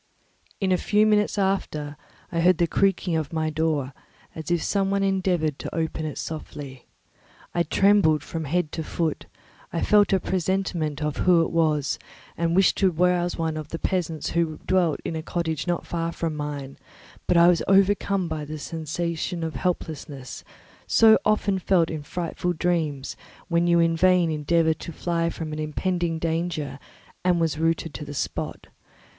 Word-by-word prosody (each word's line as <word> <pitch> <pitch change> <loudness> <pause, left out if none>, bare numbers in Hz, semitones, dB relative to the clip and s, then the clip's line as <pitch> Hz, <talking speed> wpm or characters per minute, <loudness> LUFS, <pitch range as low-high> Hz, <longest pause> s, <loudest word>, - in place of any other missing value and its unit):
In 190 -2 0
a 180 - +3
few 210 +1 +3
minutes 210 -1 +2
after, 175 -7 -1 0.4
I 170 - -1
heard 180 +1 +4
the 170 - +3
creaking 185 0 +1
of 155 -3 -2
my 160 -1 -1
door, 155 -4 -1 0.4
as 160 -1 -7
if 170 -2 +1
some 195 -1 +1
one 200 0 +1
endeavoured 180 -6 0
to - - -6
open 160 -1 -2
it 150 - -6
softly. 140 -4 -7 0.7
I 175 - +1
trembled 170 -3 +3
from 160 0 -5
head 160 +1 0
to 160 - -4
foot; 160 0 -2 0.4
I 170 - -2
felt 210 -1 +4
a 195 - +4
presentiment 175 -5 -1
of 150 -1 -2
who 175 -2 +4
it - - -3
was 150 -5 +1 0.4
and 170 0 0
wished 190 0 +4
to 195 - +4
rouse 175 +1 +1
one 160 -1 -1
of 155 -1 -5
the 165 - -4
peasants 165 -4 -2
who 165 -2 0
dwelt 180 -4 +2
in 165 - -3
a 160 - -3
cottage 160 -1 -3
not 175 -1 -1
far 165 -1 -2
from 165 -2 -3
mine; 145 -2 -5 0.5
but 180 - +3
I 170 0 +7
was 175 -2 +4
overcome 195 -1 +3
by 155 -2 -3
the 155 +1 -6
sensation 165 +2 -3
of 160 -1 -3
helplessness, 150 - -4 0.4
so 220 -1 +6
often 205 -2 +1
felt 180 -2 +2
in 155 -2 -4
frightful 175 +3 -3
dreams, 155 -5 -1 0.3
when 170 0 +2
you 170 0 +4
in 165 0 +3
vain 180 -1 +4
endeavour 160 +2 +2
to 170 - -8
fly 170 0 -1
from 160 -2 -5
an 155 - -4
impending 170 +2 -1
danger, 160 -3 -2 0.4
and 180 -1 +3
was 160 -2 0
rooted 165 -1 0
to 150 - -6
the 145 0 -8
spot. - - -4
165 Hz, 175 wpm, -25 LUFS, 155-180 Hz, 0.7 s, I